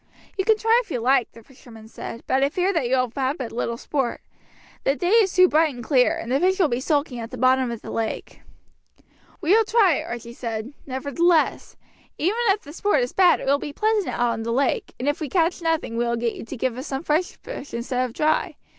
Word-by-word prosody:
"You 385 - -1
can 440 0 +4
try 450 +2 +3
if - - -25
you 250 - -2
like," 250 +1 +2
the 230 - -15
fisherman 230 -4 -15
said, 230 +1 -8
"but 265 +1 +1
I 280 - +3
fear 365 +5 0
that 275 -9 0
you 260 - +3
will 255 -2 0
have 270 +3 -1
but 250 -4 -5
little 235 0 -3
sport. 265 -1 -2 0.6
The 275 - +2
day 350 +4 -1
is 435 -4 +5
too 365 0 +6
bright 310 -3 +2
and 240 - -8
clear, 255 -1 +3
and 230 - -6
the 270 - +2
fish 375 +3 +2
will 360 -6 +3
be 240 0 -1
sulking 285 -2 -1
at 225 -1 -6
the 255 - -8
bottom 255 +1 +3
of 235 -2 -6
the - - -7
lake." 225 -1 -4 1.0
"We 335 0 +1
will 450 +1 +5
try," 425 - +3
Archie 235 0 -7
said, 230 +1 -5
"nevertheless. 305 +6 +1 0.4
Even 370 +8 0
if 400 +1 +2
the 290 - -11
sport 345 -5 +1
is 245 - -4
bad 370 -2 +4
it - - -6
will 280 +1 +2
be 290 - -6
pleasant 430 +2 +1
out 240 -1 0
on - - -5
the 230 +1 -3
lake, 280 - 0
and 255 - -3
if 290 - 0
we 305 -4 -4
catch 350 0 +1
nothing 325 -8 -1
we 235 - +1
will 235 0 0
get 235 0 -1
you - - -8
to - - -7
give 250 0 -2
us 265 - -6
some 270 +2 -4
fresh 325 +3 0
fish - - -9
instead 250 +2 -2
of 250 -2 -4
dry. 310 +3 0
275 Hz, 245 wpm, -23 LUFS, 240-350 Hz, 1.0 s, too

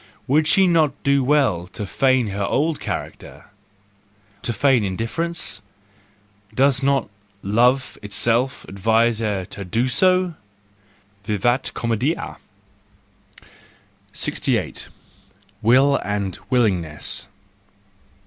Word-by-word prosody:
Would 150 +3 +2
she 190 +5 +4
not 155 -5 +2
do 140 -1 +3
well 125 - +2
to 105 - -4
feign 130 +2 +2
her 100 +1 -3
old 150 +9 0
character? - - -7 0.9
to - - -2
feign 125 +1 +3
indifference? 115 - -2 0.9
Does 135 +1 +3
not—love 115 0 0
itself 115 +5 0
advise 110 +3 +1
her 105 -4 -2
to 100 - -8
do 115 +8 0
so? 185 +5 +3 0.9
Vivat 115 +5 0
comcedia! 120 +7 -2 1.8
68. - - -1 0.7
Will 130 +5 +4
and 100 -3 -3
Willingness 95 - 0
120 Hz, 90 wpm, -21 LUFS, 105-140 Hz, 1.8 s, she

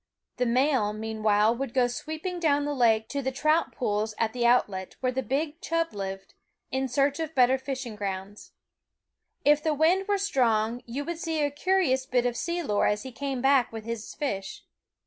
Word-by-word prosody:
The 250 - +1
male, 250 -3 +2
mean 220 0 -5
while, 215 +1 +4
would 265 0 -5
go 255 -2 +4
sweeping 315 +8 -4
down 290 -3 +2
the 290 - -1
lake 225 -4 +3
to 280 - -2
the 265 0 -2
trout 305 +5 +1
pools 215 -2 -2
at 225 -1 0
the 240 -1 +1
outlet, 200 -6 +1
where 255 -1 0
the 260 +1 -1
big 295 +7 -2
chub 330 -2 -1
lived, 195 -1 -6 0.4
in 265 +1 0
search 275 +3 +1
of 320 -1 -4
better 260 0 +4
fishing 260 -4 -5
grounds. 200 0 -6 0.9
If 295 +1 +5
the 310 -1 0
wind 345 +6 +3
were 410 -1 +2
strong, 240 - +1
you 270 +5 -4
would 340 0 -4
see 325 -4 -1
a 290 - 0
curious 290 -5 +1
bit 245 -1 +1
of 245 -1 0
sea 340 +6 -2
lore 205 -8 +1
as 210 +3 0
he 260 - -7
came 265 +1 -4
back 270 -2 +4
with 225 -1 -7
his 230 -2 -5
fish. 195 -10 -4
260 Hz, 195 wpm, -27 LUFS, 220-295 Hz, 0.9 s, If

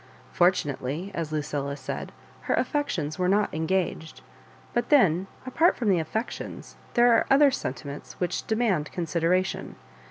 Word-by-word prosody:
Fortunately, 170 -1 0
as 165 -3 -3
Lucilla 145 -2 -2
said, - - -5 0.3
her - - +2
affec 290 -1 0
tions 155 -1 -3
were 180 - +2
not 205 +2 +2
engaged; 160 0 -2 0.5
but 240 - 0
then, 190 - +4 0.2
apart 320 +7 +3
from 230 -5 0
the 185 -3 +4
affections, 220 - -5 0.2
there 240 -1 +6
are - - +2
other 275 +1 +6
sentiments 140 - -5
which 180 -2 -3
demand 215 -10 0
consideration. 175 +2 -1
180 Hz, 135 wpm, -26 LUFS, 155-225 Hz, 0.5 s, there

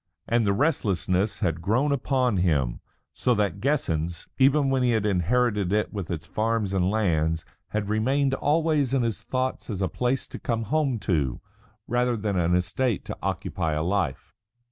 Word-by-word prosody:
And 115 -1 +2
the 100 - +3
restlessness 100 - 0
had 85 -4 0
grown 125 - +1
upon 130 -4 +1
him, 75 -9 +1 0.3
so 125 - +1
that 100 -1 -1
"Guessens," 85 - -1
even 135 +1 +4
when 135 -1 +2
he 125 - +3
had 110 -2 +1
inherited 105 +1 +1
it 105 +2 0
with 100 -5 -4
its 85 -2 -4
farms 110 +2 -1
and 95 -1 +2
lands, 80 -6 +1 0.2
had 105 -1 -2
remained 130 +6 +1
always 150 -2 +1
in 130 - +2
his 115 -2 -1
thoughts 130 0 -2
as 100 -4 -3
a 95 - +1
place 125 +5 -1
to - - -7
come 115 -2 -1
home 140 +1 0
to 70 -9 0 0.5
rather 120 0 +1
than 105 -2 -2
an 90 -1 +2
estate 100 +5 0
to - - -6
occupy 80 -4 -2
a 75 0 -1
life. 90 -6 -1
105 Hz, 170 wpm, -26 LUFS, 90-130 Hz, 0.5 s, even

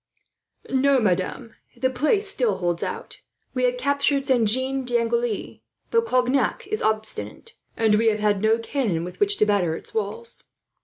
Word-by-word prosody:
"No, 270 0 +3
madame; 200 +2 -1 0.2
the 260 +2 +1
place 310 - +1
still 450 +4 0
holds 175 -2 -1
out. 465 0 -5 0.3
We 255 -1 +1
have 250 0 +1
captured 280 +1 +1
Saint 245 -6 +3
Jean 260 +3 0
d'Angely, 235 -2 -1 0.3
but 460 0 +2
Cognac 255 +2 +1
is 430 +2 -3
obstinate, 220 - -2 0.2
and 220 -2 +3
we 225 +2 +3
have 210 -2 +2
no 220 +1 +3
cannon 230 - -1
with 180 +1 -8
which 410 0 +3
to - - +4
batter 190 -6 +1
its - - -10
walls." 225 +2 -3
240 Hz, 155 wpm, -24 LUFS, 215-275 Hz, 0.3 s, to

